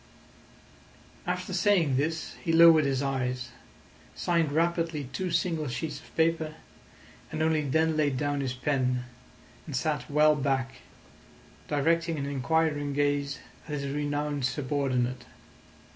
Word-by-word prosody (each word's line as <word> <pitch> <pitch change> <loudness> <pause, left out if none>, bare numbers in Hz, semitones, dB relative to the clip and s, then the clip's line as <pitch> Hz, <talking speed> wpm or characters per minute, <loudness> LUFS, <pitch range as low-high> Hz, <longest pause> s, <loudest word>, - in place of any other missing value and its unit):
After - - -2
saying 175 - +3
this 160 +4 -1
he 165 - 0
lowered 165 -2 +7
his 135 0 0
eyes, 130 -2 -2 0.7
signed 165 -4 +1
rapidly 165 -1 0
two 185 +6 -2
single 165 -2 0
sheets 135 +5 -4
of - - -19
paper, 160 -1 +1 0.8
and 155 - -1
only 160 -1 +2
then 160 +3 +1
laid 145 -4 +1
down 145 0 -1
his 130 -2 -2
pen, 130 -1 0 0.6
and 145 - -5
sat 140 +1 -1
well 150 +1 +5
back, 135 -2 -1 0.9
directing 165 +3 +1
an 140 - -2
inquiring 145 +1 0
gaze 145 0 0 0.3
at 150 - -3
his 140 0 -3
renowned 145 -1 -2
subordinate. 130 -1 -1
145 Hz, 125 wpm, -28 LUFS, 135-160 Hz, 0.9 s, lowered